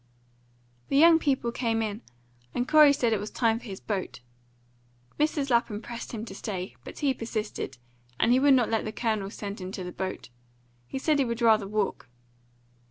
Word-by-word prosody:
The 275 Hz, -, +2 dB
young 325 Hz, +2 st, +7 dB
people 265 Hz, -6 st, 0 dB
came 230 Hz, -2 st, 0 dB
in, 215 Hz, +1 st, -4 dB, 0.5 s
and 245 Hz, +1 st, 0 dB
Corey 305 Hz, -2 st, +7 dB
said 240 Hz, -5 st, +1 dB
it 215 Hz, -, 0 dB
was 210 Hz, +1 st, -5 dB
time 230 Hz, -2 st, +1 dB
for -, -, -15 dB
his 195 Hz, -4 st, -7 dB
boat. 195 Hz, -, -4 dB, 1.0 s
Mrs. 295 Hz, -2 st, +1 dB
Lapham 235 Hz, -3 st, +2 dB
pressed 235 Hz, +1 st, -7 dB
him 225 Hz, -1 st, -5 dB
to -, -, -9 dB
stay, 190 Hz, -3 st, -5 dB
but -, -, -10 dB
he 280 Hz, -3 st, +1 dB
persisted, 215 Hz, -, -4 dB, 0.4 s
and 235 Hz, -, +3 dB
he 250 Hz, -, +5 dB
would 280 Hz, 0 st, +6 dB
not 245 Hz, -3 st, +2 dB
let 225 Hz, -, +1 dB
the 215 Hz, -, -4 dB
Colonel 215 Hz, -4 st, -1 dB
send 205 Hz, -1 st, -6 dB
him 185 Hz, +1 st, -5 dB
to 185 Hz, -, -5 dB
the 180 Hz, -, -6 dB
boat; 185 Hz, -5 st, -5 dB, 0.6 s
he -, -, -5 dB
said 295 Hz, +2 st, +1 dB
he 275 Hz, -, +3 dB
would 235 Hz, -1 st, -3 dB
rather 220 Hz, -3 st, +4 dB
walk. 200 Hz, -10 st, -2 dB
230 Hz, 190 wpm, -27 LUFS, 210-260 Hz, 1.0 s, young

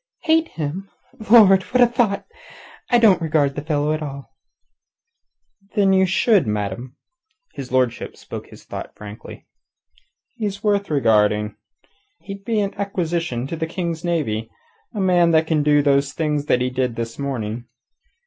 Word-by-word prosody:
"Hate 325 Hz, -1 st, +3 dB
him? 165 Hz, -, -5 dB, 0.4 s
Lord! 200 Hz, -5 st, +7 dB
What 250 Hz, +6 st, -2 dB
a -, -, +8 dB
thought! 235 Hz, -4 st, 0 dB, 0.6 s
I 240 Hz, -, +5 dB
don't 210 Hz, -7 st, +5 dB
regard 150 Hz, -3 st, +1 dB
the 145 Hz, -, -5 dB
fellow 150 Hz, 0 st, 0 dB
at 155 Hz, -, -3 dB
all." 140 Hz, -2 st, -7 dB, 1.4 s
"Then 195 Hz, -2 st, +4 dB
ye 190 Hz, 0 st, +4 dB
should, 190 Hz, -, +3 dB
ma'am." 105 Hz, +5 st, -3 dB, 0.6 s
His 135 Hz, -3 st, -8 dB
lordship 130 Hz, -2 st, 0 dB
spoke -, -, -8 dB
his -, -, -15 dB
thought -, -, -8 dB
frankly. 105 Hz, +1 st, -11 dB, 0.9 s
"He's 200 Hz, -3 st, -4 dB
worth 205 Hz, -1 st, +1 dB
regarding. 105 Hz, -6 st, +2 dB, 0.7 s
He'd 195 Hz, 0 st, -9 dB
be 220 Hz, 0 st, 0 dB
an 200 Hz, -1 st, -2 dB
acquisition 170 Hz, -10 st, -2 dB
to 150 Hz, -, -4 dB
the 160 Hz, 0 st, -3 dB
King's 170 Hz, -1 st, -4 dB
navy 115 Hz, -11 st, -1 dB, 0.4 s
a 210 Hz, -, -6 dB
man 180 Hz, -3 st, +3 dB
that 160 Hz, 0 st, +4 dB
can 160 Hz, -2 st, +1 dB
do 145 Hz, 0 st, +3 dB
the 140 Hz, -1 st, +4 dB
things 150 Hz, +1 st, -2 dB
he 125 Hz, 0 st, +2 dB
did 125 Hz, -2 st, -1 dB
this 115 Hz, +1 st, -5 dB
morning. 120 Hz, -4 st, -4 dB
155 Hz, 150 wpm, -21 LUFS, 130-195 Hz, 1.4 s, a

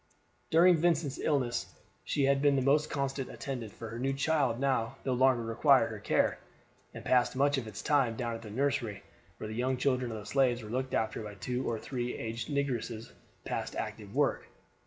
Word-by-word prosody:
During 170 Hz, +2 st, +6 dB
Vincent's 160 Hz, -4 st, +1 dB
illness 125 Hz, -6 st, -1 dB, 0.3 s
she 145 Hz, -, 0 dB
had 135 Hz, 0 st, +3 dB
been 145 Hz, -1 st, +4 dB
his 135 Hz, -1 st, +1 dB
most 150 Hz, +2 st, +3 dB
constant 135 Hz, -1 st, -2 dB
attendant; 125 Hz, -6 st, -5 dB
for 115 Hz, +2 st, -8 dB
her 125 Hz, +4 st, -2 dB
child 135 Hz, -4 st, +1 dB
now 130 Hz, -4 st, 0 dB
no 130 Hz, -, +1 dB
longer 125 Hz, -1 st, +3 dB
required 115 Hz, 0 st, +4 dB
her -, -, -6 dB
care, -, -, +1 dB, 0.5 s
and -, -, -10 dB
passed 125 Hz, -1 st, +3 dB
much 140 Hz, +1 st, +3 dB
of 115 Hz, -, -7 dB
its 105 Hz, -2 st, -7 dB
time 135 Hz, -6 st, +2 dB
down 120 Hz, -1 st, -2 dB
at 115 Hz, -, -6 dB
the 110 Hz, -, -9 dB
nursery, 115 Hz, -4 st, -1 dB, 0.3 s
where 110 Hz, -, -6 dB
the 110 Hz, -, -6 dB
young 125 Hz, +3 st, 0 dB
children 125 Hz, -2 st, 0 dB
of 110 Hz, -, -4 dB
the 105 Hz, -, -8 dB
slaves 125 Hz, -1 st, +2 dB
were 105 Hz, -, -8 dB
looked 130 Hz, +2 st, -2 dB
after 110 Hz, 0 st, -1 dB
by 105 Hz, -1 st, -7 dB
two 125 Hz, +6 st, -2 dB
or 115 Hz, -, -1 dB
three 125 Hz, +1 st, -4 dB
aged 115 Hz, +3 st, -4 dB
negresses 125 Hz, -6 st, -2 dB, 0.3 s
past -, -, -3 dB
active -, -, -5 dB
work. -, -, +1 dB
130 Hz, 195 wpm, -31 LUFS, 115-140 Hz, 0.5 s, During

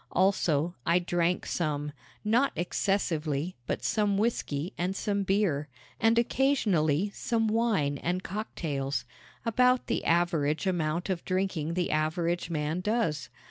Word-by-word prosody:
Also, 175 Hz, -4 st, +2 dB
I 170 Hz, +5 st, +3 dB
drank 175 Hz, 0 st, 0 dB
some 150 Hz, -3 st, -2 dB, 0.3 s
not 240 Hz, +6 st, +3 dB
excessively, 170 Hz, -3 st, -1 dB
but -, -, -2 dB
some 205 Hz, -2 st, +1 dB
whisky 190 Hz, -7 st, -1 dB
and 180 Hz, +2 st, -1 dB
some 200 Hz, 0 st, -1 dB
beer, 190 Hz, -7 st, +1 dB, 0.3 s
and 225 Hz, +1 st, +4 dB
occasionally 205 Hz, -, +2 dB
some 225 Hz, -1 st, 0 dB
wine 215 Hz, -11 st, +1 dB
and 180 Hz, +2 st, -1 dB
cocktails 145 Hz, -, -3 dB, 0.4 s
about 250 Hz, +2 st, +3 dB
the -, -, -1 dB
average 165 Hz, -2 st, +1 dB
amount 175 Hz, 0 st, 0 dB
of 175 Hz, -2 st, -3 dB
drinking 185 Hz, -4 st, -1 dB
the 180 Hz, -1 st, 0 dB
average 165 Hz, +3 st, 0 dB
man 155 Hz, +1 st, -1 dB
does. 180 Hz, -, -1 dB
175 Hz, 125 wpm, -29 LUFS, 155-205 Hz, 0.4 s, and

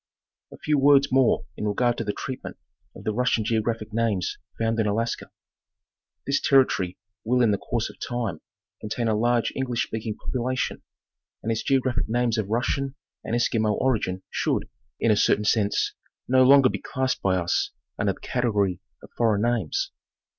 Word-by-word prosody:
Lu -, -, -11 dB
A -, -, -17 dB
few 150 Hz, -1 st, +1 dB
words 140 Hz, 0 st, +5 dB
more 130 Hz, -2 st, +3 dB
in 105 Hz, -, -3 dB
regard 120 Hz, +4 st, +1 dB
to -, -, -1 dB
the 105 Hz, -, -1 dB
treatment 130 Hz, +4 st, -6 dB, 0.4 s
of -, -, -11 dB
the 110 Hz, -, -1 dB
Russian 120 Hz, -2 st, +1 dB
'geographic 110 Hz, -1 st, -1 dB
names 110 Hz, -5 st, 0 dB, 0.2 s
found 115 Hz, 0 st, 0 dB
in 110 Hz, -, +2 dB
Alaska. 115 Hz, +3 st, -1 dB, 1.0 s
This 140 Hz, +1 st, +1 dB
territory 110 Hz, -10 st, +3 dB, 0.3 s
will 125 Hz, +3 st, +2 dB
in 115 Hz, -, +4 dB
the 100 Hz, -, 0 dB
course 115 Hz, -2 st, -2 dB
of -, -, -13 dB
time 115 Hz, -9 st, -3 dB, 0.4 s
contain 115 Hz, +2 st, -2 dB
a 110 Hz, -, +2 dB
large 120 Hz, +2 st, +1 dB
English 125 Hz, -3 st, -1 dB
speaking 110 Hz, -1 st, -4 dB
population, 130 Hz, +2 st, -2 dB, 0.6 s
and 115 Hz, -, -1 dB
its 110 Hz, -, -1 dB
geographic 130 Hz, -4 st, +1 dB
names 120 Hz, -1 st, +1 dB
of 100 Hz, -2 st, -3 dB
Russian 135 Hz, +4 st, -1 dB, 0.3 s
and 115 Hz, -, -2 dB
Eskimo 110 Hz, -3 st, +1 dB
origin 105 Hz, -8 st, 0 dB
should, -, -, 0 dB, 0.3 s
in 115 Hz, -, +3 dB
a -, -, +5 dB
certain 105 Hz, +1 st, +2 dB
sense, 105 Hz, -1 st, +1 dB, 0.3 s
no 130 Hz, +1 st, +4 dB
longer 135 Hz, 0 st, +7 dB
be -, -, -4 dB
classed 130 Hz, 0 st, -2 dB
by 95 Hz, -1 st, +2 dB
us 85 Hz, -2 st, 0 dB, 0.3 s
under -, -, +1 dB
the -, -, -18 dB
category 105 Hz, -7 st, 0 dB, 0.2 s
of -, -, -14 dB
foreign 110 Hz, -3 st, +2 dB
names. 115 Hz, -9 st, 0 dB
115 Hz, 170 wpm, -25 LUFS, 105-125 Hz, 1.0 s, longer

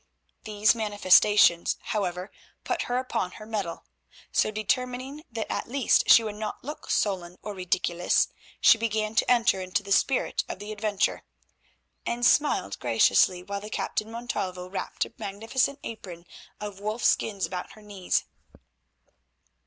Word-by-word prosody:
These 210 Hz, -1 st, +3 dB
manifestations, 205 Hz, -4 st, +4 dB
however, 185 Hz, -2 st, -3 dB, 0.3 s
put -, -, -1 dB
her 245 Hz, -, +1 dB
upon 250 Hz, -8 st, -2 dB
her 215 Hz, -, -10 dB
mettle. 205 Hz, -6 st, -4 dB, 0.5 s
So -, -, +2 dB
determining 250 Hz, +6 st, -2 dB
that 225 Hz, -1 st, -3 dB
at -, -, -3 dB
least 270 Hz, 0 st, +2 dB
she 230 Hz, -, +8 dB
would 215 Hz, -1 st, -4 dB
not 215 Hz, -1 st, -5 dB
look 295 Hz, +4 st, -8 dB
sullen 180 Hz, -3 st, -1 dB
or 210 Hz, -, -5 dB
ridiculous, 180 Hz, -2 st, +1 dB, 0.3 s
she 225 Hz, -, +6 dB
began 215 Hz, -1 st, -1 dB
to 225 Hz, -, +2 dB
enter 235 Hz, -5 st, +3 dB
into 185 Hz, +2 st, -1 dB
the 200 Hz, -, -9 dB
spirit 265 Hz, +6 st, +2 dB
of -, -, -4 dB
the 205 Hz, +2 st, -8 dB
adventure, 210 Hz, -2 st, -1 dB, 0.8 s
and 240 Hz, +1 st, -1 dB
smiled 260 Hz, -, +2 dB
graciously 120 Hz, -, +3 dB
while 200 Hz, +1 st, -5 dB
the 210 Hz, -, -8 dB
Captain 215 Hz, 0 st, -3 dB
Montalvo 190 Hz, -6 st, -4 dB
wrapped 190 Hz, +1 st, -3 dB
a -, -, -14 dB
magnificent 225 Hz, +7 st, -1 dB
apron 180 Hz, -6 st, -8 dB, 0.3 s
of 205 Hz, -2 st, -7 dB
wolf 215 Hz, +3 st, -3 dB
skins 200 Hz, -3 st, +1 dB
about 180 Hz, -1 st, -6 dB
her 215 Hz, +1 st, -16 dB
knees. 200 Hz, -3 st, -1 dB
210 Hz, 145 wpm, -27 LUFS, 185-225 Hz, 0.8 s, she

